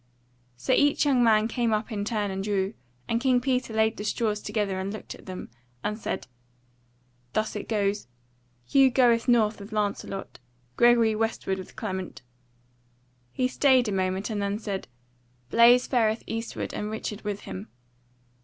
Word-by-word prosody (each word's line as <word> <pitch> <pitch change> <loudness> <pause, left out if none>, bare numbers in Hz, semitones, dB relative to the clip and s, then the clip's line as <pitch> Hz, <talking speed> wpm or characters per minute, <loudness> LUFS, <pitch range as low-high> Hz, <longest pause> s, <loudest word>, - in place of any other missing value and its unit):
So 255 - 0
each 290 +3 +3
young 260 -4 +4
man 220 -1 +4
came 235 -1 0
up 215 +3 -1
in 205 -2 -2
turn 210 -2 -1
and 190 0 -3
drew; 200 0 0 0.3
and 230 +1 0
King 255 -1 +3
Peter 250 -1 -1
laid 220 0 +1
the 210 - -5
straws 210 -1 -1
together 205 -3 -1
and 190 +1 -3
looked 215 - -7
at - - -15
them, 185 -9 -7 0.3
and 210 - -1
said: 215 - -4 1.1
"Thus 215 0 -1
it 210 - -6
is, 205 - 0 0.6
Hugh 270 - +5
goeth 240 -2 +3
north 225 -3 +3
with 200 +2 -10
Lancelot, 205 -4 -3 0.4
Gregory 235 -2 +5
westward 215 -3 -1
with 185 - -10
Clement." 190 - -5 1.1
He 255 - 0
stayed 255 -2 +3
a - - -2
moment 190 +2 -1
and 210 -1 -2
then 200 0 -1
said: 205 -3 -4 0.6
"Blaise 240 +2 +6
fareth 225 -3 +1
eastward 225 +1 -4
and 210 - -3
Richard 215 -1 -5
with 205 -1 -4
him. 95 +3 -7
215 Hz, 160 wpm, -27 LUFS, 200-235 Hz, 1.1 s, Blaise